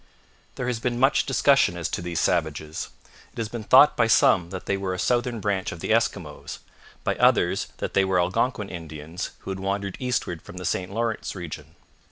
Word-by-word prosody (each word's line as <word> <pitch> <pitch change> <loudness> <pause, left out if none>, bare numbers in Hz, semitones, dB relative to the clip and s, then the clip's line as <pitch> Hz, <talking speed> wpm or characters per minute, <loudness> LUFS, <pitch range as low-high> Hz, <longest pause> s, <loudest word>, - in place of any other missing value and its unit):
There 125 - -3
has 125 -2 -1
been 120 0 -1
much 135 +2 +3
discussion 140 -11 +3
as 85 - -2
to - - -3
these 85 -1 -3
savages. 80 -2 -1 0.4
It - - -21
has 115 -2 -2
been 115 -1 -6
thought 135 +7 +7
by 115 - +3
some 90 -5 +4
that 95 0 -7
they 100 - 0
were 95 -1 -2
a - - -6
southern 120 +3 0
branch 100 -2 -1
of - - -8
the - - -3
Eskimos, - - -1 0.5
by - - +1
others - - +3
that - - -4
they 100 - +4
were 95 -1 +2
Algonquin 100 +5 0
Indians 80 0 -6
who - - -6
had 95 - -4
wandered 100 0 -2
eastward 125 -10 -2
from 90 - -12
the 90 - -6
St 90 +2 -1
Lawrence 115 0 -2
region. 85 -5 -8
95 Hz, 200 wpm, -25 LUFS, 85-115 Hz, 0.5 s, thought